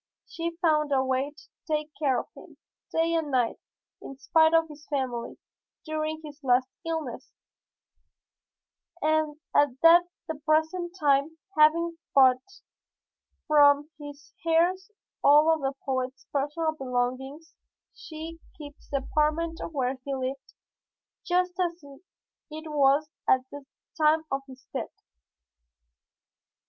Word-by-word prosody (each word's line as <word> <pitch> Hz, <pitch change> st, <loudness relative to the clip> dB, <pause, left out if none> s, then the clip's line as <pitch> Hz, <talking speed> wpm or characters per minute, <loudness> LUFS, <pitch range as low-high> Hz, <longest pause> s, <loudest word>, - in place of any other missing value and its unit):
She 335 Hz, 0 st, -5 dB
found 305 Hz, -3 st, +2 dB
a 265 Hz, -1 st, +2 dB
way 260 Hz, +2 st, 0 dB
to -, -, -15 dB, 0.3 s
take 305 Hz, 0 st, -1 dB
care 270 Hz, -5 st, +2 dB
of -, -, -6 dB
him, -, -, -15 dB, 0.3 s
day 330 Hz, +1 st, +1 dB
and 325 Hz, -3 st, 0 dB
night, 250 Hz, -4 st, +1 dB, 0.4 s
in 275 Hz, -, -9 dB
spite 320 Hz, +3 st, +3 dB
of 325 Hz, 0 st, +3 dB
his 300 Hz, -1 st, -14 dB
family, 255 Hz, -5 st, -3 dB, 0.5 s
during 310 Hz, 0 st, -3 dB
his 295 Hz, 0 st, -11 dB
last 255 Hz, 0 st, +3 dB, 0.2 s
illness, 320 Hz, -7 st, -4 dB, 1.7 s
and 310 Hz, -1 st, 0 dB, 0.2 s
at 290 Hz, 0 st, +5 dB
the 335 Hz, -2 st, +4 dB
present 320 Hz, +3 st, 0 dB
time, 290 Hz, +2 st, +2 dB, 0.2 s
having 330 Hz, +2 st, +3 dB, 0.2 s
bought 255 Hz, -2 st, +6 dB, 1.0 s
from 290 Hz, 0 st, +5 dB
his 290 Hz, 0 st, -11 dB
heirs 345 Hz, +4 st, +2 dB, 0.3 s
all 300 Hz, +3 st, +6 dB
of 315 Hz, -, -2 dB
the 270 Hz, 0 st, -1 dB
poet's 260 Hz, -1 st, -3 dB
personal 300 Hz, +3 st, 0 dB
belongings, 265 Hz, +2 st, -3 dB, 0.4 s
she 325 Hz, +1 st, -9 dB, 0.2 s
keeps 290 Hz, -2 st, -12 dB
the 275 Hz, -2 st, -2 dB
apartment 315 Hz, +2 st, 0 dB
where 260 Hz, -3 st, -2 dB
he 275 Hz, 0 st, -3 dB
lived 265 Hz, +1 st, -5 dB, 0.7 s
just 360 Hz, +1 st, 0 dB
as 345 Hz, -1 st, -1 dB, 0.7 s
it 315 Hz, 0 st, -8 dB
was 285 Hz, +1 st, +3 dB, 0.2 s
at 260 Hz, -, +5 dB
the 285 Hz, -1 st, -10 dB, 0.3 s
time 310 Hz, +1 st, +4 dB
of 270 Hz, 0 st, -1 dB
his 260 Hz, -1 st, -14 dB
death. -, -, -3 dB
300 Hz, 120 wpm, -27 LUFS, 275-325 Hz, 1.7 s, bought